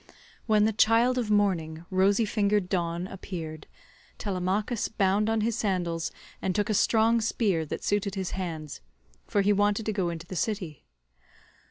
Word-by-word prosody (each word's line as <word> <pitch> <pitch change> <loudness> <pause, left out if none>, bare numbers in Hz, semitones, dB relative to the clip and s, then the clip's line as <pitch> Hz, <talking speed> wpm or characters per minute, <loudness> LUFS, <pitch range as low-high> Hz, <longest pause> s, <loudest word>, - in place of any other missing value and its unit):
When 215 -1 +4
the 220 - +1
child 230 +4 +4
of 230 -3 -2
morning, 175 -6 +1
rosy 195 +4 +3
fingered 205 -2 +1
Dawn, 170 -1 -1
appeared, 170 -5 -7 0.5
Telemachus 200 +4 -1
bound 205 +1 +1
on 225 -1 +1
his 225 +1 0
sandals 175 -6 -1 0.3
and 185 - -1
took 210 +1 +1
a - - +2
strong 225 +2 +3
spear 195 -7 0
that - - -5
suited 205 -1 0
his 190 -2 -3
hands, 160 -6 -5 0.5
for 200 - +2
he 205 +1 +3
wanted 205 +2 +1
to 215 - -1
go 190 -4 0
into 170 0 -6
the 185 - -8
city. 185 - -3
200 Hz, 160 wpm, -27 LUFS, 180-215 Hz, 0.5 s, When